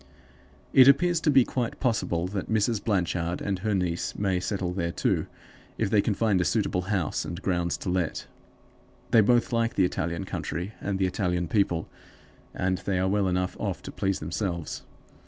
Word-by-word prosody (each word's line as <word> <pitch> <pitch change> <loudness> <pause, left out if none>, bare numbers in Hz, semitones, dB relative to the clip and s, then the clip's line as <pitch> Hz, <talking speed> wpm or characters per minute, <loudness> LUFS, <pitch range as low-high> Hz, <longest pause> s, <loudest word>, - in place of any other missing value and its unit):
It 130 -1 +8
appears 170 +4 +4
to 160 - +2
be 135 -3 +6
quite 120 -3 -3
possible 110 -9 0
that 95 -1 -4
Mrs. 110 -1 +1
Blanchard 90 -4 0
and 100 -2 -2
her 105 +1 0
niece 90 -2 -2
may 95 -3 +1
settle 90 -1 -2
there, 85 -2 -1
too, - - 0 0.5
if - - 0
they 105 -2 +5
can 105 0 0
find 105 -5 +2
a - - +2
suitable 95 -2 0
house 95 -7 0
and 85 - -5
grounds 85 -4 -1
to 95 - -5
let. 90 -2 -1 0.9
They 115 - +7
both 120 +3 +3
like 115 0 +1
the 95 - +4
Italian 85 -2 -2
country 90 +5 -4
and 100 -1 -1
the 95 - +1
Italian 90 -2 -1
people, 85 -3 +1 0.6
and 95 -1 -1
they 95 +1 -1
are 95 +1 +1
well 100 0 +1
enough 90 0 -1
off - - -3
to - - -7
please 95 -1 -1
themselves. 85 +1 -3
95 Hz, 180 wpm, -27 LUFS, 90-110 Hz, 0.9 s, It